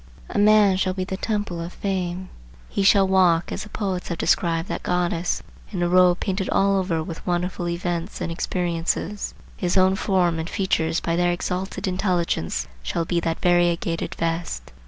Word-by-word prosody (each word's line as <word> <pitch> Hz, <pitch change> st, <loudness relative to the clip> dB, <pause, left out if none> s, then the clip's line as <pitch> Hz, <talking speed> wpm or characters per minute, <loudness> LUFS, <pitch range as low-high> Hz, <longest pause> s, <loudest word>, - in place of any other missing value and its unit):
A -, -, 0 dB
man 205 Hz, -2 st, +5 dB
shall 185 Hz, 0 st, 0 dB
be 185 Hz, -, -1 dB
the 190 Hz, +1 st, -4 dB
Temple 205 Hz, -4 st, -2 dB
of 170 Hz, +2 st, -6 dB
Fame. 185 Hz, -2 st, -3 dB, 0.4 s
He -, -, -1 dB
shall 195 Hz, 0 st, +5 dB
walk, 180 Hz, -3 st, +3 dB
as -, -, -3 dB
the 210 Hz, -, -8 dB
poets 190 Hz, -4 st, -3 dB
have 170 Hz, -, -3 dB
described 165 Hz, 0 st, +1 dB
that -, -, -3 dB
goddess, 175 Hz, -1 st, 0 dB, 0.3 s
in 180 Hz, -4 st, -1 dB
a -, -, +2 dB
robe 180 Hz, 0 st, +5 dB
painted 190 Hz, -1 st, -1 dB
all 195 Hz, 0 st, +3 dB
over 170 Hz, -4 st, -1 dB
with 165 Hz, -1 st, -7 dB
wonderful 180 Hz, 0 st, -1 dB
events 170 Hz, +1 st, -3 dB
and -, -, -3 dB
experiences;—his 175 Hz, +2 st, -2 dB
own 190 Hz, 0 st, +5 dB
form 180 Hz, -4 st, +1 dB
and 160 Hz, +2 st, -4 dB
features 165 Hz, -5 st, 0 dB
by 165 Hz, -, 0 dB
their 175 Hz, 0 st, +2 dB
exalted 180 Hz, +2 st, -3 dB
intelligence 180 Hz, -, 0 dB
shall 165 Hz, -, -2 dB
be 175 Hz, +1 st, 0 dB
that 165 Hz, -1 st, -2 dB
variegated 175 Hz, -1 st, +1 dB
vest. 165 Hz, -, -3 dB
180 Hz, 170 wpm, -23 LUFS, 170-190 Hz, 0.4 s, man